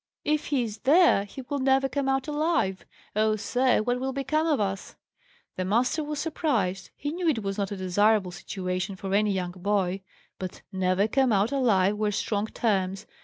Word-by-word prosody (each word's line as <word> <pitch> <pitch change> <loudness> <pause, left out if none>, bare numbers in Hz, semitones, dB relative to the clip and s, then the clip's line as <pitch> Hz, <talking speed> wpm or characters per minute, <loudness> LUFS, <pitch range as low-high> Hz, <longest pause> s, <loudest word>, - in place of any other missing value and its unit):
"If 300 0 +1
he 275 -4 +1
is 220 -2 -6
there, 300 - +5
he 260 +6 -9
will 280 +3 -3
never 270 0 +3
come 270 0 -1
out 270 +1 0
alive! 300 - 0 0.3
Oh, 215 0 +2
sir, 245 +2 +1
what 245 +2 0
will 265 +1 -2
become 305 +4 0
of 300 -4 +2
us?" 195 -2 -3 0.6
The 185 - -1
master 250 - +1
was 300 0 -4
surprised. 280 - -1
He 290 - -4
knew 345 +1 -2
it 245 -9 +1
was 195 +1 -3
not 200 -1 -1
a 200 - -4
desirable 190 +1 +2
situation 185 +1 -4
for 195 0 -5
any 210 +1 +3
young 180 -2 -2
boy; 190 0 -1 0.4
but 185 -1 -7
"never 190 +1 +1
come 265 +1 +2
out 205 +3 +2
alive" 210 -7 +2
were 210 0 +1
strong 205 +1 -1
terms. 195 -3 -1
215 Hz, 185 wpm, -27 LUFS, 195-270 Hz, 0.6 s, there